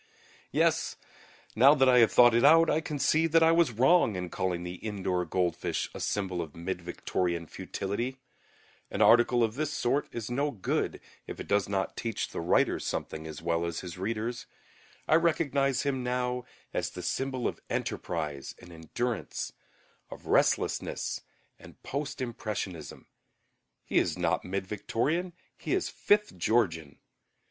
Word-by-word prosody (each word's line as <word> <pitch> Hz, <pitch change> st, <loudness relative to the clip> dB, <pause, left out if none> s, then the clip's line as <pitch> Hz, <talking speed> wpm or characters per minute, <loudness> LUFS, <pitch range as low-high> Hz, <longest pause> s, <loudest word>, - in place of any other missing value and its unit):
Yes; -, -, +1 dB, 0.6 s
now 135 Hz, +6 st, +7 dB
that 135 Hz, -2 st, +4 dB
I 125 Hz, -1 st, +6 dB
have 115 Hz, -, +5 dB
thought 120 Hz, -1 st, +7 dB
it 120 Hz, -, +3 dB
out, 165 Hz, +3 st, +7 dB
I 160 Hz, -, +2 dB
can 150 Hz, -2 st, -4 dB
see 155 Hz, +3 st, +3 dB
that 165 Hz, 0 st, +4 dB
I 160 Hz, -, +6 dB
was 165 Hz, -3 st, +4 dB
wrong 130 Hz, -, +4 dB
in 90 Hz, -1 st, -4 dB
calling 90 Hz, -2 st, -2 dB
the 90 Hz, +1 st, -6 dB
indoor 95 Hz, -4 st, -2 dB
goldfish 90 Hz, +1 st, -1 dB
a -, -, -7 dB
symbol 95 Hz, -4 st, -1 dB
of 80 Hz, -3 st, -8 dB
mid 90 Hz, +2 st, -4 dB
Victorian 85 Hz, 0 st, -2 dB
futility. 115 Hz, +10 st, -4 dB, 0.7 s
An -, -, +1 dB
article 120 Hz, +1 st, +5 dB
of 110 Hz, -1 st, 0 dB
this 150 Hz, +4 st, -2 dB
sort 140 Hz, -1 st, 0 dB
is 115 Hz, 0 st, -5 dB
no 140 Hz, +4 st, +1 dB
good 110 Hz, -9 st, -2 dB, 0.3 s
if -, -, -7 dB
it -, -, -6 dB
does 100 Hz, -1 st, +1 dB
not 95 Hz, -1 st, -1 dB
teach 115 Hz, -3 st, -3 dB
the -, -, -5 dB
writer 85 Hz, -, +2 dB
something 80 Hz, 0 st, -4 dB
as 80 Hz, +1 st, -8 dB
well 85 Hz, 0 st, 0 dB
as 85 Hz, -1 st, -3 dB
his 90 Hz, 0 st, -8 dB
readers. 115 Hz, +4 st, -3 dB, 0.6 s
I -, -, +3 dB
recognize 140 Hz, -5 st, +1 dB
him 135 Hz, -3 st, -1 dB
now 125 Hz, 0 st, -1 dB, 0.3 s
as -, -, -1 dB
the 90 Hz, -, -8 dB
symbol 130 Hz, +6 st, -1 dB
of -, -, -5 dB
enterprise 75 Hz, -5 st, -3 dB
and 90 Hz, -, -14 dB
endurance, 95 Hz, +7 st, -4 dB, 0.6 s
of -, -, -11 dB
restlessness -, -, +1 dB, 0.4 s
and -, -, -15 dB
Post 140 Hz, 0 st, -4 dB
Impressionism. 105 Hz, -8 st, -5 dB, 0.8 s
He -, -, +2 dB
is -, -, -1 dB
not -, -, 0 dB
mid 95 Hz, +1 st, -3 dB
Victorian, 145 Hz, -, -1 dB, 0.3 s
he -, -, -1 dB
is -, -, -1 dB
Fifth 210 Hz, -, +1 dB
Georgian. 80 Hz, -9 st, +1 dB
115 Hz, 155 wpm, -29 LUFS, 90-135 Hz, 0.8 s, now